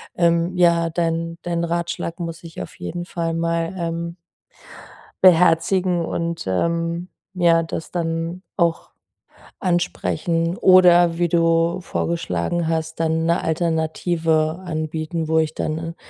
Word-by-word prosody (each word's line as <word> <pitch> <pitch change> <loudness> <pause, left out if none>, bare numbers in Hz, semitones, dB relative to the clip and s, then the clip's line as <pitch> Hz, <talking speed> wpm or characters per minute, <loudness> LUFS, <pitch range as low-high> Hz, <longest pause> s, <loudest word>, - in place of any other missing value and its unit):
ähm, 170 +1 +2
ja, 170 -1 +3
dein 165 0 -2
dein 170 -1 -1
Ratschlag 170 0 -3
muss 165 -1 -6
ich 165 -1 -8
auf - - -8
jeden 175 0 -5
Fall 165 -2 -3
mal, 165 0 -1
ähm 170 0 -3 1.1
beherzigen 180 0 +4
und, 170 0 -3
ähm, 170 - -1 0.3
ja 170 -2 +3
das 160 0 -6
dann 165 +1 -3
auch 170 -3 0 0.7
ansprechen 170 -1 -1
oder 175 -2 +6
wie 175 0 +2
du 165 +1 +2
vorgeschlagen 170 - -2
hast, 160 0 -2
dann 160 0 +1
'ne 170 +1 +2
Alternative 160 0 0
anbieten, 160 -1 -3
wo 160 0 +3
ich 160 0 -1
dann 165 +2 -3
170 Hz, 120 wpm, -21 LUFS, 165-175 Hz, 1.1 s, oder